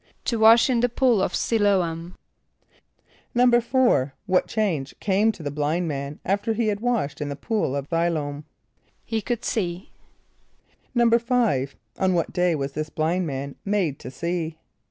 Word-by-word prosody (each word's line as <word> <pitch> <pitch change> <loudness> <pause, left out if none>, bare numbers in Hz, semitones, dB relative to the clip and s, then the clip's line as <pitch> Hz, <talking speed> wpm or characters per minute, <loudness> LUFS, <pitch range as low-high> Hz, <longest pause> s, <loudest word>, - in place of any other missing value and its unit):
=To 230 - 0
wash 225 +1 +7
in 250 -3 +2
the 245 +1 +2
pool 240 -4 +2
of - - 0
S[)i] 230 - 0
l[=o]´am.= 180 -4 0 1.2
=4.= 240 - +3
What 185 -1 +2
change 170 -11 -1
came 205 +3 +2
to 185 -6 -12
the 145 - -3
blind 150 +4 -1
man 140 -1 -4
after 200 +4 0
he 220 0 0
had 205 -1 -1
washed 215 -12 -1
in 145 - -2
the 140 - -4
pool 175 - -1
of 140 -1 -3
S[)i] 165 +1 +2
l[=o]´am? 145 -3 -3 0.6
=He 225 -1 -2
could 235 +1 -3
see.= 180 -4 -2 1.0
=5.= 235 - +2 0.2
On 185 -1 +2
what 170 - -1
day 180 -2 +2
was 140 -1 -3
this 155 +2 -4
blind 165 +4 0
man 140 0 -5
made 195 -9 0
to - - -8
see? 165 +3 -3
180 Hz, 160 wpm, -24 LUFS, 150-225 Hz, 1.2 s, wash